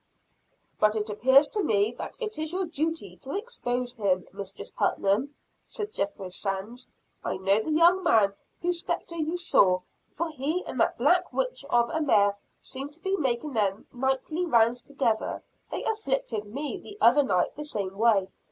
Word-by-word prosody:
"But 215 0 +4
it 210 0 -2
appears 265 +7 +5
to 420 - -1
me 210 - +2
that - - -6
it 440 -7 -3
is 315 0 -2
your 375 +1 -1
duty 315 - -3
to 270 +10 -7
expose 250 - -2
him, 195 -6 0
Mistress 195 0 -6
Putnam," 225 +9 0 0.3
said 425 -1 -6
Jethro 200 -1 -3
Sands. 195 +6 -5 0.3
"I - - -2
know 195 +3 +3
the 220 - -5
young 345 +4 +5
man 200 -3 +4 0.3
whose 350 0 +1
spectre 335 0 -4
you 320 +2 -1
saw, 185 - +3 0.3
for 340 0 -1
he 310 +5 -2
and - - -5
that - - +2
black - - +3
witch - - -2
of 235 0 +3
a 320 - -1
mare 205 -8 +4 0.2
seem 270 +2 -5
to 295 +3 -13
be 385 +2 0
making 270 -3 -1
their 200 -4 +1 0.2
nightly 265 +6 -1
rounds 240 -6 +3
together. 240 -6 -1 0.3
They - - -4
'afflicted' 270 - -1
me 290 - -3
the 405 +3 -11
other 280 +2 +6
night 185 -10 +1
the 300 - -5
same 200 -10 -3
way. 205 -3 +3
260 Hz, 170 wpm, -27 LUFS, 210-325 Hz, 0.3 s, other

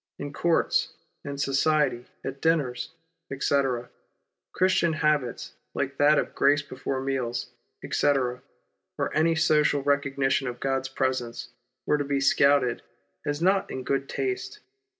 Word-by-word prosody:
In 145 0 -6
courts, 170 -1 +1 0.3
in 140 0 -5
society, 140 -2 +1 0.2
at 135 0 -6
dinners, 150 -7 0 0.4
etc., 135 -3 0 0.6
Christian 185 -3 +2
habits, 150 -5 0 0.2
like 140 0 -2
that 150 +1 +5
of - - -1
grace 145 0 +3
before 135 -1 -4
meals, 130 -3 -2 0.3
etc., 125 -3 +1 0.6
or - - -2
any 165 +2 +3
social 150 -3 +3
recognition 140 -1 +1
of 120 0 -5
God's 135 -1 -1
presence, 130 -3 -2 0.4
were 150 - +2
to - - 0
be 140 0 -1
scouted 140 -2 +3 0.5
as 145 +2 -1
not 190 +1 +2
in 130 - -5
good 135 +1 -1
taste. 390 +2 -3
140 Hz, 130 wpm, -26 LUFS, 130-150 Hz, 0.6 s, that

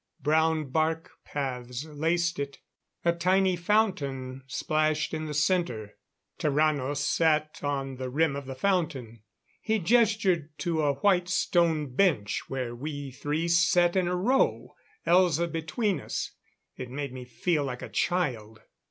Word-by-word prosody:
Brown 155 0 +1
bark 160 +2 0
paths 125 -1 -4
laced 165 +3 0
it; 140 0 -4 0.5
a 170 - +4
tiny 185 +2 +2
fountain 145 -10 0
splashed 155 +3 0
in 155 0 -3
the 150 - -4
center. 150 - 0 0.4
Tarrano 145 -2 +1
sat 155 +1 +1
on 135 -2 -2
the 130 0 -4
rim 150 +2 +1
of 140 -1 -6
the 135 - -5
fountain; 140 - -1 0.4
he 220 0 +1
gestured 195 -7 +2
to 160 +1 -1
a 145 -2 +2
white 180 -3 +3
stone 165 -6 +1
bench 125 - +2
where 130 -3 -3
we 145 +2 -5
three 150 +5 -2
sat 175 +1 +4
in 185 -2 +2
a 180 - 0
row, 245 +9 +1 0.3
Elza 170 -2 +4
between 170 +6 -1
us. - - -4 0.4
It 125 -1 -7
made 140 0 -5
me 130 -1 -7
feel 145 +6 -1
like 125 -3 -5
a - - -5
child. 115 -11 -1
155 Hz, 140 wpm, -28 LUFS, 135-175 Hz, 0.5 s, a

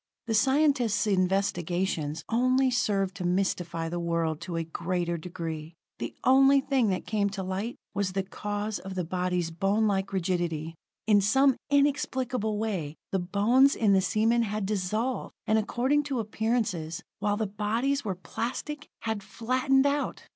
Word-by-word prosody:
The 230 - -1
scientists' 265 -4 +3
investigations 180 -5 0
only 255 +3 +3
served 195 -6 +1
to 185 - -4
mystify 175 -2 -1
the 175 +1 -3
world 170 -2 -1
to 175 0 -5
a 165 - 0
greater 170 +1 -2
degree. 165 -1 -6 0.2
The - - -5
only 270 +2 +6
thing 270 -4 +1
that 185 - -2
came 205 -2 0
to 195 -1 -5
light 190 +6 -3 0.2
was 195 -2 -1
the 195 0 0
cause 205 +2 -4
of 190 0 -7
the 180 - -1
bodies' 180 -1 -1
bonelike 195 +2 +1
rigidity. 170 -4 -1 0.3
In 205 -1 +5
some 265 +6 +4
inexplicable 260 -6 +1
way 190 -9 -2 0.2
the 195 - +1
bones 215 +10 +4
in 210 -3 +3
the 190 - +4
seamen 220 +5 +2
had 210 -2 -2
dissolved, 215 +5 -2
and 220 +1 +3
according 255 +7 +1
to 275 -3 -2
appearances, 215 -7 -1 0.2
while 205 0 0
the 220 - 0
bodies 225 +8 -1
were 195 -4 -2
plastic, 275 - -5
had 220 -2 -2
flattened 255 +6 +1
out. 285 +1 -1
205 Hz, 150 wpm, -28 LUFS, 180-240 Hz, 0.3 s, only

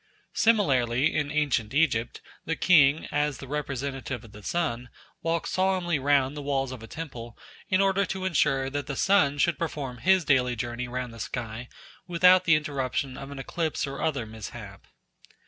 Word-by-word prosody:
Similarly 135 - +2
in 150 -2 0
ancient 140 -6 0
Egypt 130 -7 +1 0.2
the 160 - -2
king, 155 -4 +4
as 145 -1 0
the 135 - -9
representative 135 -3 -4
of 115 - -14
the 105 - -12
sun, 125 - -2 0.3
walked 165 -1 -1
solemnly 185 -4 +1
round 140 0 +2
the 145 - -5
walls 135 -2 -1
of 130 -3 -8
a 115 - -9
temple 120 -6 -8 0.3
in 185 +1 +3
order 195 0 +3
to 190 -1 -4
ensure 145 -6 +2
that 145 -1 -3
the 140 - -3
sun 180 -7 +3
should 170 +4 +1
perform 140 -7 -4
his 185 +3 +3
daily 125 -3 +3
journey 120 +2 -4
round 125 -1 -4
the 115 - -11
sky 120 +1 -5 0.4
without 180 +1 +5
the 160 - +6
interruption 140 -3 -2
of 135 +1 -8
an 140 - -8
eclipse 160 +4 -2
or 140 0 -6
other 140 -7 -1
mishap. 110 -2 -9
140 Hz, 170 wpm, -27 LUFS, 125-165 Hz, 0.4 s, the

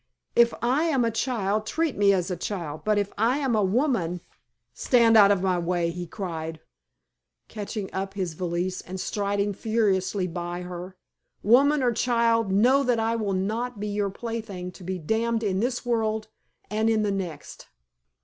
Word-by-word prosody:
If 235 0 +6
I 265 +7 +2
am 270 -7 +2
a 230 - +1
child, 215 -3 -1
treat 320 +1 0
me 200 -1 +4
as 185 -1 0
a - - -1
child; 170 -7 -5
but 215 -1 +2
if 205 -1 -1
I 235 +5 +3
am 270 -5 0
a 215 - +3
woman 195 - 0 0.3
" - - -54 0.2
"Stand 235 -3 +4
out 205 -2 +8
of 200 -2 +2
my 185 -2 +1
way!" 170 -1 0
he 175 0 -6
cried, 165 -5 -5 0.9
catching 210 -1 -5
up 195 +1 -4
his 185 -4 -2
valise 180 +2 -2
and 190 +1 -7
striding 200 +1 -1
furiously 200 -3 0
by 175 0 -4
her. 180 +1 -8 0.5
"Woman 275 +6 +5
or 245 - +3
child, 230 -3 +2
know 245 +8 +4
that 245 -4 +1
I 225 +1 +1
will 210 -4 -1
not 220 +5 -2
be 210 +1 -3
your 205 -1 -1
plaything 210 -4 -5
to 180 - -13
be 185 +1 -3
damned 225 +7 0
in 190 -3 0
this 245 +3 -1
world 220 -2 -1 0.4
and 220 +2 0
in 220 -1 +2
the 205 - 0
next." 185 -5 -6
205 Hz, 180 wpm, -26 LUFS, 185-230 Hz, 0.9 s, out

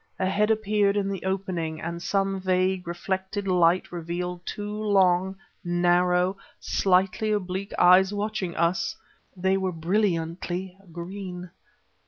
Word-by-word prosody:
A - - 0
head 210 +3 +1
appeared 210 -2 +2
in 200 -1 0
the 195 -2 -4
opening 185 -4 -2
and 170 +1 -5
some 195 +1 0
vague, 185 -1 +1
reflected 190 +3 -3
light 180 -1 +3
revealed 175 +1 -4
two 205 0 -4
long, 190 -2 +3 0.3
narrow, 180 +1 +2 0.2
slightly 190 +3 +1
oblique 195 -1 -2
eyes 185 +2 +6
watching 205 -4 -3
us. 170 +2 0 0.4
They 190 +1 +2
were 190 -1 -1
brilliantly 175 0 -1 0.2
green. 180 +1 -7
185 Hz, 120 wpm, -26 LUFS, 175-195 Hz, 0.4 s, eyes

